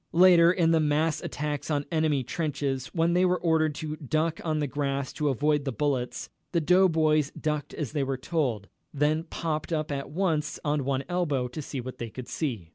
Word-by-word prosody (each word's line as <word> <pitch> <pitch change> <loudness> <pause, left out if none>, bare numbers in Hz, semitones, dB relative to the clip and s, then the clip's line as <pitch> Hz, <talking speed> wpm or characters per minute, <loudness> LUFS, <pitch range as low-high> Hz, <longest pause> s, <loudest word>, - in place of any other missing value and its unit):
Later, 175 -1 +7
in 170 -3 +2
the 165 - +4
mass 155 +1 +1
attacks 150 0 -4
on 145 -2 0
"enemy 155 -4 +1
trenches," 135 -2 -2
when 165 0 +1
they 180 +1 +3
were 180 0 +2
ordered 160 -3 +2
to 155 0 -5
duck 155 +3 -1
on 155 -2 0
the 150 - 0
grass 140 -1 -2
to 150 -1 0
avoid 145 +2 +1
the 135 - -2
bullets, 130 0 -2 0.2
the 170 - +3
doughboys 160 -4 +3
ducked 150 -2 -2
as 150 -6 -3
they 150 -1 -1
were 135 0 -2
told, 130 - -1 0.2
then 150 +2 +1
popped 160 -1 -3
up 155 -2 -1
at 140 -1 -3
once 155 -2 -1
on 145 -2 0
one 135 0 0
elbow 160 -8 0
to 140 +6 -6
see 140 -1 -5
what 125 +1 -7
they 115 - -4
could 125 +2 -8
see. 115 - -3
150 Hz, 200 wpm, -27 LUFS, 140-160 Hz, 0.2 s, Later